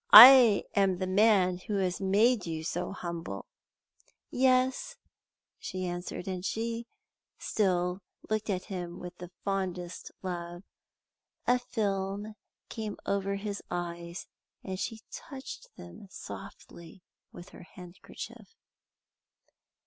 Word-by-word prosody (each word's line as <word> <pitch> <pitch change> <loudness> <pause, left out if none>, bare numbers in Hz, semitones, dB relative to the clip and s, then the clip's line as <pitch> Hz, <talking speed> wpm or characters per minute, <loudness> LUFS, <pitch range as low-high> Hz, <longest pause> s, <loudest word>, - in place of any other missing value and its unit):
I 240 -2 +11
am 195 -2 +3
the 185 - -1
man 185 -2 +4
who 205 +3 -4
has 185 -2 0
made 205 +2 +3
you 160 -1 -3
so 175 +2 -2
humble." 170 - -5 0.9
"Yes," 255 0 +2 0.6
she 185 0 -4
answered, 175 0 -5
and 185 -1 -3
still 230 +3 -2 0.5
she 180 -2 -1
looked 215 0 -1
at 185 -2 0
him 180 -3 -5
with 180 0 -8
the 180 -1 -8 0.2
fondest 185 -3 -3
love. 175 -1 -5 0.8
A 250 0 +4
film 205 -3 -2 0.3
came 215 -2 -5
over 200 0 0
his 200 0 -4
eyes, 170 0 -4 0.4
and 185 -1 -5
she 225 0 -4
touched 270 -3 -8
them 85 - -11
softly 170 -1 -10 0.3
with 175 - -11
her - - -13
handkerchief. 180 - -11
190 Hz, 110 wpm, -30 LUFS, 175-215 Hz, 0.9 s, I